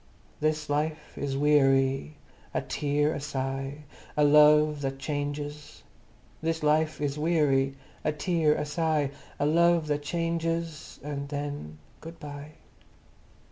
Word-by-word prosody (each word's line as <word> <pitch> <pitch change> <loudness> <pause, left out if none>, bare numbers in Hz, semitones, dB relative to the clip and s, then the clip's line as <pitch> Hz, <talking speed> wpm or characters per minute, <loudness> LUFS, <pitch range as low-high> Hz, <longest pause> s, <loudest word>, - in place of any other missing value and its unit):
This 155 0 0
Life 150 +1 -2
is 135 -1 -2
Wee 150 +1 +5
ary, 135 - +2 0.4
A - - +1
Tear—a 145 +1 0
Sigh. 135 0 -4 0.3
A 150 - +4
Love 150 0 +6
that 135 -1 -2
Chan 145 +1 -2
ges, 145 0 -8 0.6
This 160 0 -1
Life 155 +1 +2
is 145 0 -2
Wee 165 +2 +1
ary, 135 -2 +2 0.3
A 155 - +1
Tear—a 150 -1 +1
Sigh. 150 -2 0 0.3
A - - 0
Love 170 +1 +4
that 145 -1 -1
Chan 165 +2 -1
ges, 165 -1 -3
And 140 -1 -4
then... 145 - -5 0.2
Good 165 +1 -10
bye! 145 +1 -8
150 Hz, 135 wpm, -28 LUFS, 145-155 Hz, 0.6 s, Love